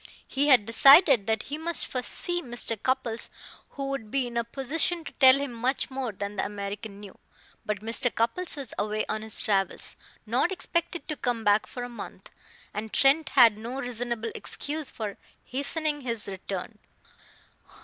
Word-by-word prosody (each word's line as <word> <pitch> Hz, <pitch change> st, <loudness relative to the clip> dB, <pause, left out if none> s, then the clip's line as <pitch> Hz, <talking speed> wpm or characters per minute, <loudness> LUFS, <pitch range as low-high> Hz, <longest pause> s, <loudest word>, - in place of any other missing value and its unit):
He 280 Hz, +2 st, 0 dB
had 255 Hz, -7 st, +5 dB
decided 270 Hz, -, +6 dB
that 220 Hz, -1 st, 0 dB
he 295 Hz, +3 st, -6 dB
must 335 Hz, +1 st, +4 dB
first 250 Hz, -2 st, -2 dB
see 350 Hz, 0 st, +1 dB
Mr. 240 Hz, -4 st, +3 dB
Cupples, 255 Hz, -3 st, -2 dB, 0.4 s
who 275 Hz, -1 st, -4 dB
would 220 Hz, -6 st, -5 dB
be 270 Hz, +2 st, 0 dB
in 240 Hz, -1 st, -7 dB
a 235 Hz, -, 0 dB
position 295 Hz, +8 st, -1 dB
to -, -, -9 dB
tell 260 Hz, -2 st, +8 dB
him 275 Hz, -2 st, -3 dB
much 250 Hz, +4 st, -1 dB
more 260 Hz, -3 st, -4 dB
than 200 Hz, +1 st, -6 dB
the -, -, 0 dB
American 200 Hz, 0 st, -6 dB
knew. 205 Hz, -2 st, -13 dB, 0.5 s
But 210 Hz, -1 st, -3 dB
Mr. 230 Hz, +3 st, 0 dB
Cupples 295 Hz, +10 st, +2 dB
was 270 Hz, -5 st, -5 dB
away 215 Hz, +1 st, -1 dB
on 215 Hz, 0 st, -3 dB
his 220 Hz, -1 st, +4 dB
travels, 195 Hz, -2 st, 0 dB, 0.3 s
not -, -, 0 dB
expected 345 Hz, -2 st, -3 dB
to 305 Hz, -, -3 dB
come 245 Hz, -5 st, -3 dB
back 205 Hz, 0 st, +2 dB
for 245 Hz, -, -7 dB
a -, -, -5 dB
month; 240 Hz, -1 st, -10 dB, 0.4 s
and 215 Hz, +1 st, -6 dB
Trent 275 Hz, +2 st, +3 dB
had 230 Hz, -4 st, +6 dB
no 240 Hz, +4 st, -6 dB
reasonable 235 Hz, -2 st, -3 dB
excuse 300 Hz, 0 st, -4 dB
for 210 Hz, -3 st, -6 dB, 0.3 s
hastening 295 Hz, +3 st, 0 dB
his 230 Hz, -5 st, -2 dB
return. 195 Hz, +2 st, -7 dB
245 Hz, 170 wpm, -26 LUFS, 215-275 Hz, 0.5 s, tell